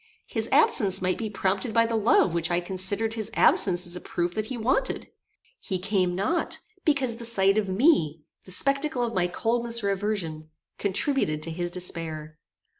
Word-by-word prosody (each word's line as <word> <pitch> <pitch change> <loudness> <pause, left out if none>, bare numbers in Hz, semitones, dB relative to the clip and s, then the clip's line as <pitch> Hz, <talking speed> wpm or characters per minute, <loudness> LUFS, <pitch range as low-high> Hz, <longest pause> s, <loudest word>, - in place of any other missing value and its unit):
His - - -2
absence 200 - +4
might 185 0 -1
be 220 -2 -3
prompted 200 +2 -2
by 230 0 +4
the 230 0 -2
love 210 -5 +3
which 170 -1 0
I 175 0 +1
considered 190 +5 +2
his 220 -2 -3
absence 180 -1 +4
as 175 0 -3
a 180 - -7
proof 175 0 -3
that 215 +2 -3
he 255 - -5
wanted. 230 +3 -1 0.5
He 190 - -3
came 185 -2 -1
not 210 - -1 0.3
because 270 -7 +1
the 235 - -8
sight 195 -4 +3
of 200 -3 -3
me, 185 - +2 0.2
the 185 - -10
spectacle 275 - +1
of 235 -1 -2
my 180 -3 +1
coldness 235 +4 -1
or 200 - +1
aversion, 185 -6 -3 0.3
contributed 200 - 0
to 165 - -3
his 175 +1 -3
despair. 160 -4 -5
195 Hz, 180 wpm, -26 LUFS, 175-230 Hz, 0.5 s, absence